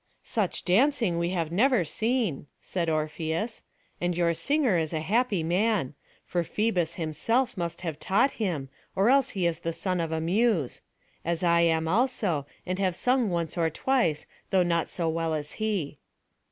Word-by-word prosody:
"Such 210 -5 -1
dancing 210 - +3
we 170 0 0
have 170 -3 -2
never 235 +2 +3
seen," 220 - -1
said 170 -3 -2
Orpheus; 160 +7 -2 0.4
"and 175 -1 0
your 170 -1 +2
singer 280 - +1
is 160 -1 0
a 160 - 0
happy 205 +1 +1
man; 180 - +1 0.3
for 175 - 0
Phœbus 180 -4 0
himself 205 - 0
must 170 -2 -4
have 160 -4 -4
taught 230 +8 +2
him, 160 -10 -1 0.3
or 200 +5 +4
else 275 0 +4
he 180 - +1
is 170 -1 0
the 165 -1 -3
son 185 0 -1
of 165 -1 -3
a 160 - 0
Muse; 180 - +1 0.4
as 170 +1 -1
I 170 -1 +4
am 160 -1 +2
also, 195 - +1 0.2
and 185 +1 -2
have 185 -3 +1
sung 250 +1 +2
once 170 -1 -2
or 165 -1 +3
twice, 170 - 0 0.2
though 185 -1 +4
not 170 -1 0
so 170 -2 -2
well 165 0 0
as 150 -1 -4
he." 190 -10 -1
175 Hz, 170 wpm, -27 LUFS, 160-220 Hz, 0.4 s, or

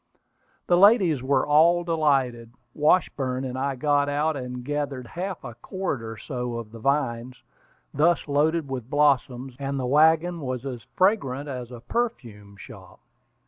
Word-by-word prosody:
The 175 - +3
ladies 190 - +5
were 135 +2 +1
all 165 +4 +4
delighted. 135 -8 0 0.2
Washburn 135 -5 +1
and 125 -1 -5
I 135 +1 -2
got 145 +1 +1
out, 150 +2 0
and 125 -2 -6
gathered 145 -3 -3
half 180 +7 -6
a 120 - -7
cord 155 - -4
or 115 -1 -7
so 125 -3 -5
of 115 -2 -7
the 115 - -10
vines, 125 -2 -2 0.5
thus 165 +4 +2
loaded 150 +2 +1
with 130 -3 -6
blossoms, 135 -3 +1
and 140 0 -3
the 130 - -2
wagon 160 +5 +3
was 130 -1 -4
as 125 -4 -5
fragrant 145 - +1
as 125 -4 -6
a 120 -2 -10
perfume 115 - -4
shop. - - -13
140 Hz, 150 wpm, -25 LUFS, 125-155 Hz, 0.5 s, ladies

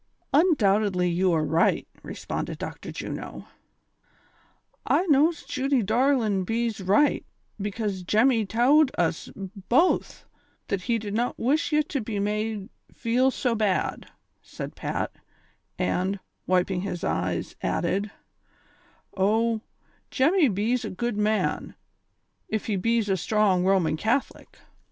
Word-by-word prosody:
" - - -41
Undoubtedly 210 - +3
you 180 +2 +2
are 160 -2 +1
riglit," 160 +3 +2 0.2
responded - - -5
Dr. - - -7
Juno. - - -6 1.4
"I 365 - +2
knows 310 0 +3
Judy 270 -3 0
darlin' 225 -3 +2
bees 225 +1 -2
right, 205 +11 +3 0.4
becase 205 -1 -3
Jemmy 220 +3 +3
tould 260 +8 +4
us 165 -2 -1
both 200 - 0 0.4
that 200 -2 -1
he 235 +4 0
did 210 -2 -5
not 240 +3 -1
wish 285 +9 +1
ye 300 0 +3
to 285 -2 -3
be 210 -1 -4
made 210 0 -2 0.2
feel 245 +3 +1
so 250 -2 -1
bad," 210 -4 -1 0.3
said - - -8
Pat, - - -3 0.7
and, 190 +2 0 0.3
wiping 180 0 +1
his 180 -3 -4
eyes, 90 +1 -2
added: 195 +5 -1 0.6
'' - - -32
O, 220 +3 +2 0.5
Jemmy 310 +4 +3
bees 225 +5 0
a 215 - -4
good 235 +4 -3
man, 210 +1 0 0.8
ef 215 -1 -1
he 215 - -1
bees 230 +3 +1
a 195 - +2
strong 195 -1 +2
Roman 185 -5 +2
Catholic." 225 - -2
215 Hz, 125 wpm, -26 LUFS, 190-245 Hz, 1.4 s, tould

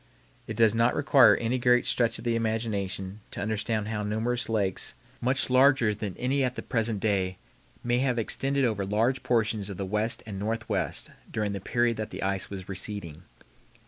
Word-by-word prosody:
It 110 - -4
does 110 -2 +5
not 115 +2 +2
require 140 -3 +6
any 120 +3 -1
great 125 0 +4
stretch 115 -2 +1
of - - -10
the 120 -1 0
imagination 105 -4 -2
to - - -8
understand 110 +1 -1
how 105 -1 -2
numerous 110 +4 -1
lakes, 100 -4 -1 0.3
much 130 +2 +2
larger 130 -3 +4
than 105 -2 -5
any 135 +2 +1
at 125 -1 -1
the - - -5
present 115 -3 -1
day, 95 -3 0 0.5
may 120 0 +1
have 130 -2 +1
extended 135 +4 +1
over 105 -4 0
large 115 +7 +1
portions 110 -4 0
of 100 - -6
the 95 - -3
West 105 +4 0
and 100 -3 -6
Northwest 110 +2 -2 0.2
during 105 -2 -2
the 100 -1 -4
period 120 +2 +1
that 110 -1 -4
the - - -6
ice 95 -1 -1
was 95 -2 -7
receding. 95 -4 -5
110 Hz, 180 wpm, -27 LUFS, 100-120 Hz, 0.5 s, require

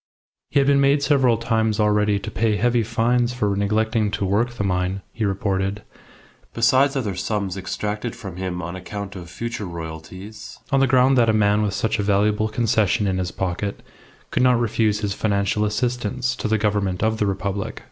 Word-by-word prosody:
He 145 - +2
had 140 - +3
been 140 0 +4
made 140 +1 +3
several 135 -5 +3
times 110 -1 0
already 105 -1 +2
to - - -6
pay 110 +1 +1
heavy 120 +2 +2
fines 120 +2 +1
for 105 -5 0
neglecting 110 +2 +1
to 100 - -2
work 105 +5 +1
the 120 -3 -4
mine, 95 0 -1
he 115 -2 -2
reported, 100 0 -1 0.7
besides 130 +5 +3
other 115 -8 -1
sums 95 0 -2
extracted 105 +4 -4
from 95 -4 -8
him 90 -1 -4
on 85 +2 -5
account 100 +2 -7
of 85 -2 -8
future 115 +2 -5
royalties, 85 +5 -8
on 135 - +3
the 135 - +4
ground 130 +1 +4
that 115 -1 +4
a - - +3
man 105 0 +3
with 105 -2 -1
such 110 +1 -1
a - - +1
valuable 105 +2 +2
concession 110 -3 +1
in 95 -1 0
his 90 -1 -2
pocket 95 +2 -3 0.5
could - - +1
not 125 -2 +4
refuse 110 -2 +1
his 100 -2 -1
financial 100 0 0
assistance 125 +2 -1
to - - -3
the 110 +1 +2
Government 100 -3 0
of 110 0 +1
the 105 - +1
Republic. 100 0 -3
105 Hz, 190 wpm, -22 LUFS, 100-115 Hz, 0.7 s, been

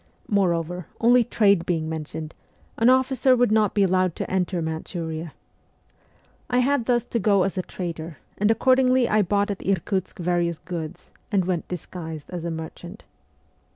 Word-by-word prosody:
Moreover, 175 -4 0
only 240 +1 +5
trade 200 -6 +3
being 165 -3 -1
mentioned, 160 0 -5 0.5
an 230 +2 +5
officer 260 0 +4
would 245 -3 +2
not 215 -2 +2
be 205 - +4
allowed 185 -2 +2
to - - -5
enter 185 -1 0
Manchuria. 160 0 -4 1.2
I 245 - +1
had 250 -1 +2
thus 240 -2 +2
to 235 - -2
go 200 -2 +3
as 195 - -2
a 185 - 0
trader, 165 -4 -6 0.2
and 205 +1 +3
accordingly 255 +2 +4
I 215 - +3
bought 205 +2 +1
at 200 - -5
Irkutsk 190 0 -1
various 175 -1 0
goods, 170 0 -7 0.2
and 195 -4 +2
went 180 -3 -2
disguised 160 -3 -7
as 175 -2 -5
a 170 - -2
merchant. 170 +4 -8
185 Hz, 155 wpm, -24 LUFS, 170-220 Hz, 1.2 s, only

